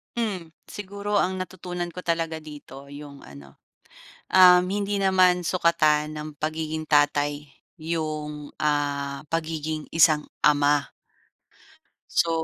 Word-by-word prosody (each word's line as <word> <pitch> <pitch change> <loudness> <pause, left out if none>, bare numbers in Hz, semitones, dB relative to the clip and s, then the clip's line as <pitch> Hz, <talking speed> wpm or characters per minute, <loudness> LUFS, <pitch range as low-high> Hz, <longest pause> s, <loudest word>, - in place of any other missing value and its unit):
Hmm, 190 -9 -3 0.2
siguro 205 +1 -3
ang 190 0 0
natutunan 180 -1 -5
ko 180 - -8
talaga 165 -1 -1
dito 145 -3 -11
'yong 145 0 -11
ano, 70 -1 -14 0.7
uhm, 180 -1 +7
hindi 200 0 -1
naman 185 -2 +4
sukatan 155 -4 +2
ng 150 0 -6
pagiging 155 +1 -3
tatay 145 -1 +1 0.3
'yong 155 -2 -4
ah, 145 -2 -1
pagiging 160 -1 -3
isang 155 -2 +4 0.2
ama. 145 -1 +4 1.3
So, 170 - +2
155 Hz, 105 wpm, -25 LUFS, 150-180 Hz, 1.3 s, uhm